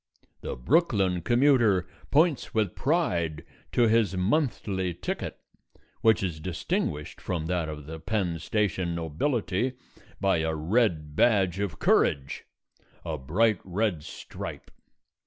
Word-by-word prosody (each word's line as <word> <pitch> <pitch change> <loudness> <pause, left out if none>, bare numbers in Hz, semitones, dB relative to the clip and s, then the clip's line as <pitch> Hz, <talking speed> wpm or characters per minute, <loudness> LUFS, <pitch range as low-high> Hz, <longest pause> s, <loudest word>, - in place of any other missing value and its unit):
The - - -4
Brooklyn 100 - +2
commuter 120 - +3 0.2
points 155 -4 +2
with 105 -5 +1
pride 90 - 0 0.3
to 120 - +4
his 110 -5 +3
monthly 95 - 0
ticket, - - -4 0.6
which 110 -3 +4
is 85 -5 -2
distinguished 75 -3 -3
from 85 -4 -3
that 85 -2 -1
of 75 -2 -7
the 80 +2 -7
Penn 90 -2 -1
Station 90 -1 -1
nobility 100 - -1 0.5
by 95 -2 +2
a 80 0 -1
red 80 -3 0
badge 95 -3 +3
of 100 -6 -2
courage 70 -1 +1 0.6
a 80 -2 -2
bright 95 +9 +2
red 95 -2 -1
stripe. - - -8
95 Hz, 120 wpm, -27 LUFS, 80-115 Hz, 0.6 s, to